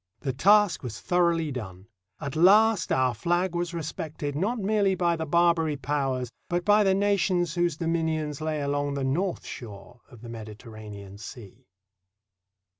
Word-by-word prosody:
The 135 -3 -2
task 205 +7 +4
was 120 -5 -6
thoroughly 170 -3 +1
done. 95 -7 -7 0.3
At 140 -3 -5
last 205 +3 +5
our 130 -1 +2
flag 175 +5 0
was 175 0 -2
respected 155 -3 -5
not 205 +11 0
merely 200 -2 +1
by 170 -2 +1
the 160 -1 -4
Barbary 165 -2 +2
Powers, 135 -3 -2 0.2
but 175 0 -1
by 210 +1 +5
the 190 -1 +3
nations 190 -4 +1
whose 175 -3 0
dominions 160 -3 -1
lay 155 -1 -2
along 145 0 -1
the 140 - -2
north 170 +8 -1
shore 110 0 -10
of 120 -5 -15
the 120 - -9
Mediterranean 105 -3 -10
Sea. 110 -4 -11
155 Hz, 150 wpm, -26 LUFS, 130-175 Hz, 0.3 s, last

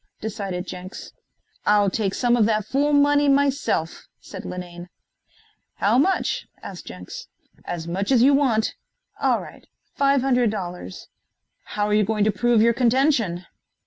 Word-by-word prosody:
decided 195 -4 -4
Jenks. 185 0 -9 0.5
"I'll 205 -2 +3
take 200 -1 -1
some 245 -1 +2
of 220 -3 +3
that 215 -2 0
fool 280 +6 +1
money 290 0 +4
myself," 275 - 0
said - - -10
Linane. 175 -1 -8 0.9
"How 220 +5 +2
much?" 380 +7 0 0.2
asked 185 -3 -9
Jenks. 90 0 -9 0.4
"As 170 -2 -5
much 195 +5 -2
as 245 -3 +5
you 280 +2 +6
want." 250 -6 +2 0.5
"All - - +2
right - - -12 0.3
five 275 -1 +2
hundred 250 -3 +2
dollars." 180 - -6 0.7
"How 205 0 0
you 210 0 +4
going 210 0 0
to 215 - +3
prove 235 +1 +2
your 235 0 +4
contention?" 235 - +1
215 Hz, 145 wpm, -23 LUFS, 185-265 Hz, 0.9 s, you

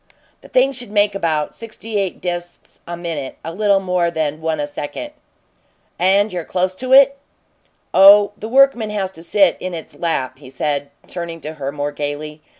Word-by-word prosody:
"The - - -14
thing 260 +2 +3
should 245 -4 -7
make 205 -1 +2
about 160 -6 -1
sixty 225 -1 -5
eight 195 -2 -3
disks 175 -1 -6
a 175 0 -5
minute 165 -6 -5
a 165 - -5
little 200 +1 +3
more 180 -2 0
than 155 -2 -2
one 160 -1 -1
a 145 - 0
second." 145 - -6 0.9
"And 195 +3 +3
you're 175 -2 -3
close 185 +2 -1
to 255 +3 -4
it?" 275 +1 +7 0.7
"Oh, 200 +1 +8
the 220 - -7
workman 260 -4 +4
has 200 -3 -2
to 165 - -12
sit 190 +1 +3
in 185 -1 -4
its 160 - -9
lap," 130 -6 -2
he 135 -3 -12
said, 140 +2 -2 0.2
turning 170 -2 -6
to 155 +1 -6
her 140 -3 -4
more 145 0 -3
gaily. 150 +1 -5
175 Hz, 180 wpm, -19 LUFS, 155-205 Hz, 0.9 s, Oh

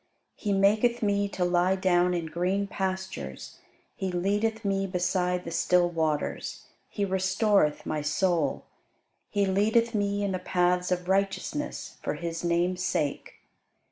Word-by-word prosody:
He 210 - -3
maketh 210 +5 +3
me 200 -1 +1
to 185 -2 -1
lie 175 +1 +2
down 180 -1 +2
in 170 -2 -2
green 180 +5 -1
pastures: 190 - -5 0.4
He 190 -1 -3
leadeth 205 +5 0
me 195 0 0
beside 180 0 0
the 170 - -6
still 175 +1 +2
waters. 160 -3 -2 0.3
He 205 - -1
restoreth 190 -3 +2
my 155 - -2
soul: 165 +1 0 0.6
He 205 -1 +1
leadeth 220 +5 +2
me 205 -1 0
in 200 - 0
the 185 - -2
paths 180 0 +1
of 180 0 -1
righteousness 195 +10 -2
for - - -2
his 170 -1 -4
name's 175 +1 +1
sake. 145 -5 -1
185 Hz, 140 wpm, -27 LUFS, 175-200 Hz, 0.6 s, maketh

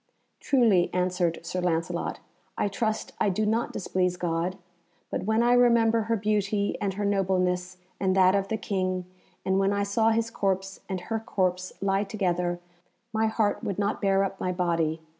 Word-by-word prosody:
"Truly," 225 -10 +3
answered 180 -2 0
Sir 180 +2 -2
Lancelot, 165 -2 -1 0.4
"I - - +1
trust 215 +1 -2
I - - +3
do 210 +3 0
not 225 +3 0
displease 180 -1 -1
God, 175 +1 -1 0.5
but - - -2
when 220 +2 +2
I 240 +1 +4
remember 235 -2 +4
her 230 - +3
beauty, 205 -1 0
and 195 -2 -1
her 205 +1 -2
nobleness, 185 -2 0 0.2
and 190 -1 +1
that 185 -1 +5
of 195 -1 +1
the 220 - -1
King, 185 -3 -2 0.4
and 190 0 +2
when 195 0 +2
I 200 0 0
saw 220 +3 +2
his 225 0 0
corpse 195 -3 -1
and 190 -2 -3
her 225 +4 -2
corpse 185 -4 -1
lie 195 0 +1
together, 180 -4 -1 0.5
my 220 0 +2
heart 220 -1 0
would 195 - -2
not 205 0 -1
bear 195 -1 +3
up 195 0 -4
my 185 - -1
body. 170 -3 0
195 Hz, 175 wpm, -27 LUFS, 180-215 Hz, 0.5 s, that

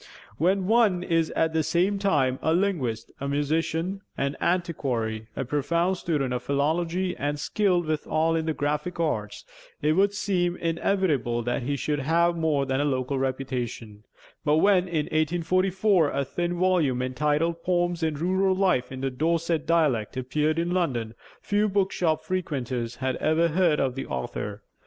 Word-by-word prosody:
When 185 +4 +2
one 210 -4 +3
is 165 -2 +1
at 160 0 +1
the 160 - +2
same 185 +5 +1
time 140 -10 +1
a 160 +1 +2
linguist, 170 - -1
a 140 - -3
musician, 160 +6 -1 0.2
an 140 +1 -1
antiquary, 125 -11 -1
a 135 - -2
profound 170 +7 0
student 145 -8 -1
of 125 - -2
philology, 165 +6 0
and 145 +1 -2
skilled 180 +2 +1
withal 155 +1 0
in 160 0 -1
the 160 - +1
graphic 150 +4 -2
arts, 165 - -2 0.3
it 150 - +2
would 200 +5 +2
seem 180 -4 0
inevitable 165 - 0
that 120 +3 -1
he 140 +4 -1
should 145 +1 -1
have 170 +4 +2
more 155 -4 +1
than 130 0 -1
a - - +1
local 130 -1 -1
reputation; 125 -5 -4 0.4
but 150 -1 +3
when, 185 +1 +4
in 160 -4 -1
1844, 175 +3 +2
a 140 0 -1
thin 175 +5 -2
volume 170 -9 +2
entitled 150 +6 0
'Poems 175 -1 0
of 155 -3 -1
Rural 190 +3 +2
Life 185 -11 +1
in 130 0 -6
the 135 0 -1
Dorset 165 +2 0
Dialect' 145 -11 +1
appeared 150 +5 0
in 170 +1 0
London, 125 -12 -1 0.3
few 210 +1 +1
bookshop 180 -5 0
frequenters 130 -9 -3
had 130 -1 -2
ever 165 +2 +2
heard 165 -2 +2
of 130 -2 +1
the 135 - -5
author. 105 - -5
160 Hz, 160 wpm, -26 LUFS, 135-175 Hz, 0.4 s, when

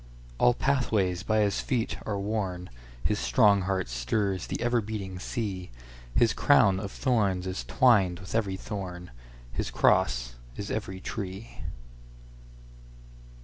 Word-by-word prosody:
All 120 - +5
pathways 110 -11 +1
by 110 +2 +2
his 100 -2 +1
feet 120 -4 -1
are 105 -2 -1
worn, 100 - -3 0.3
His - - +1
strong 100 - +4
heart 95 -6 0
stirs 90 - -1
the - - -3
ever 120 0 +2
beating 100 -3 -5
sea, 95 -3 -4 0.5
His 115 - +4
crown 110 -10 +4
of 100 -1 -5
thorns 100 -8 +1
is 95 0 -3
twined 100 -9 +3
with 95 - -9
every 105 -4 0
thorn, 90 - -6 0.4
His - - -2
cross - - +2 0.2
is 100 - -4
every 100 -4 -4
tree. 100 +2 -6
100 Hz, 130 wpm, -28 LUFS, 90-110 Hz, 0.5 s, All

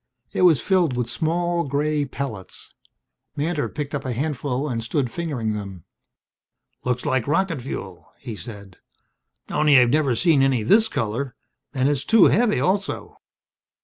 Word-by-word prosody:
It - - -1
was 175 -6 +6
filled 175 -10 +1
with 120 -1 -2
small 170 +6 0
grey 145 +1 0
pellets. 130 -8 -6 0.6
Mantor 155 +1 -1
picked 145 -1 -5
up 145 - -2
a 130 - -3
handful 140 0 -2
and 115 -4 -3
stood 125 +1 -1
fingering 140 -11 -2
them. 100 -5 -7 1.0
"Looks 125 -1 -1
like 130 -2 0
rocket 165 -1 0
fuel," 95 -7 -7
he 120 -5 -7
said. 100 -4 -10 0.7
"Only 150 -2 +4
I've 120 -1 +4
never 145 -4 +2
seen 160 -1 +3
any 135 -4 +2
this 220 - +4
color. 120 - -3 0.4
And 130 0 +2
it's 145 -1 0
too 225 -4 +5
heavy, 225 -1 +3
also." 195 +2 -1
140 Hz, 145 wpm, -23 LUFS, 120-160 Hz, 1.0 s, was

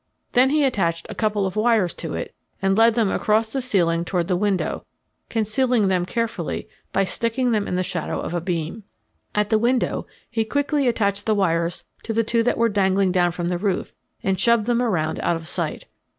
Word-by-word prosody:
Then 255 +2 +4
he 300 +1 +2
attached 170 -10 0
a - - -5
couple 210 -2 0
of 190 - -3
wires 215 -5 +2
to - - -5
it - - -5 0.3
and 195 0 +2
led 225 +1 +5
them 225 -5 +2
across 220 +1 +1
the 270 - -1
ceiling 170 -9 +1
toward 175 -1 -1
the 185 - +1
window, 195 0 -1 0.5
concealing 225 -1 +1
them 180 -2 +1
carefully 230 -6 -3 0.2
by 195 - +2
sticking 235 +5 0
them 210 -2 0
in - - -2
the 185 - +1
shadow 170 -3 -3
of - - -4
a 175 - -1
beam. 170 +3 -3 0.5
At 210 +1 +1
the 220 - +4
window 245 +2 0 0.2
he 225 -1 -1
quickly 285 +4 0
attached 205 -3 0
the 215 - +3
wires 170 -3 0 0.2
to 225 - -4
the 230 +1 +2
two 230 +1 +1
that 245 - +1
were 230 - +3
dangling 195 -2 +2
down 175 -1 +2
from 175 0 -3
the 175 -1 -1
roof 200 -1 -1 0.3
and 190 -1 0
shoved 235 -2 +4
them 240 0 +1
around 175 -10 0
out 170 - +1
of 165 -1 -7
sight. 140 - -2
205 Hz, 205 wpm, -23 LUFS, 180-230 Hz, 0.5 s, led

